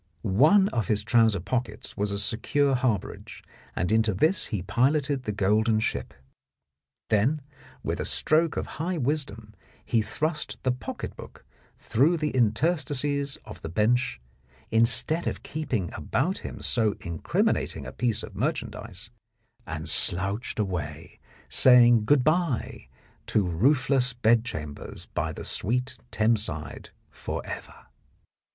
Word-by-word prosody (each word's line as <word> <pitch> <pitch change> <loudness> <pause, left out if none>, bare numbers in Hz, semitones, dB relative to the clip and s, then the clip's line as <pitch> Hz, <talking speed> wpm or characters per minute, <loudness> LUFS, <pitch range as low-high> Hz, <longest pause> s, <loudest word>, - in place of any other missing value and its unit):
One 150 - +5
of 115 -5 -2
his 105 -2 +1
trouser 115 -4 +3
pockets 105 +4 -4
was 105 0 -1
a 100 - -1
secure 135 +7 +1
harbourage, 125 -6 -2 0.3
and 90 - -1
into 110 -2 +2
this 160 - +2
he 100 -5 -3
piloted 135 - +1
the 105 - -1
golden 105 +2 +2
ship. - - -3 1.0
Then, 115 +9 +3 0.4
with - - -2
a - - -2
stroke 160 +1 +2
of - - -1 0.2
high 175 +2 -1
wisdom, 125 -7 -3 0.3
he 115 - +2
thrust 150 +9 -2
the 130 - +2
pocket 125 - -6
book - - -12 0.3
through 150 +9 +2
the 150 -1 -1
interstices 140 +3 +1
of 105 - -10
the 80 - -6
bench 110 - +1 0.5
instead 115 +9 +2
of - - -3
keeping 125 - -3
about 180 +9 -1
him - - -8
so 110 -4 +1
incrimin 85 -3 0
ating - - -5
a - - -6
piece 115 -3 -1
of 105 - -9
merchandise, 110 - -4 0.6
and - - -5
slouched 100 +6 +1
away, 85 -7 -4 0.3
saying 120 -3 +6
good 135 +2 +4
bye 155 -4 0 0.4
to 105 - +2
roofless 130 - +2
bedchambers 110 -11 -1
by - - -1
the - - -8
sweet 125 +3 -2
Thames 110 0 +2
side 75 -7 -6 0.2
for - - -5
ever. - - -8
115 Hz, 130 wpm, -26 LUFS, 105-140 Hz, 1.0 s, saying